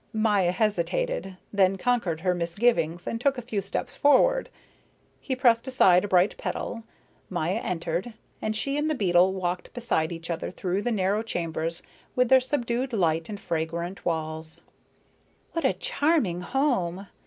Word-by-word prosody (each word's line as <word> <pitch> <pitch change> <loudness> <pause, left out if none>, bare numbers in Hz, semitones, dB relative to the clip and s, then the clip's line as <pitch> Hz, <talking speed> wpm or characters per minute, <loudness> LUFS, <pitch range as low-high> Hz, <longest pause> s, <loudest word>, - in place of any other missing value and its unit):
Maya 210 -5 +2
hesitated, 210 - -1 0.2
then 195 -1 +4
conquered 190 -8 0
her 180 0 +2
misgivings 170 -1 0
and 230 - -3
took 275 0 +2
a - - -3
few 220 -4 -2
steps - - -4
forward. - - +4 0.7
He 260 - -3
pressed 240 -1 +3
aside 185 -9 +5
a - - -3
bright 185 +1 +3
petal, 230 -1 -4 0.4
Maya 180 +4 -1
entered, 175 +5 -3 0.3
and 215 0 -1
she 275 +6 -1
and 300 +1 0
the 310 - +1
beetle 185 -4 +4
walked 180 -1 -3
beside 230 -10 0
each 165 0 -5
other 165 - -3
through 185 +1 -2
the 240 - -1
narrow 200 0 +1
chambers 165 -5 -3 0.3
with 250 -1 +3
their 265 0 +8
subdued 250 -1 -1
light 165 -4 +1
and 205 -1 -5
fragrant 170 +2 -3
walls. 160 -1 -4 0.9
"What 330 -4 -2
a 265 - +4
charming 285 - +1
home!" 200 - 0
195 Hz, 155 wpm, -26 LUFS, 175-245 Hz, 0.9 s, their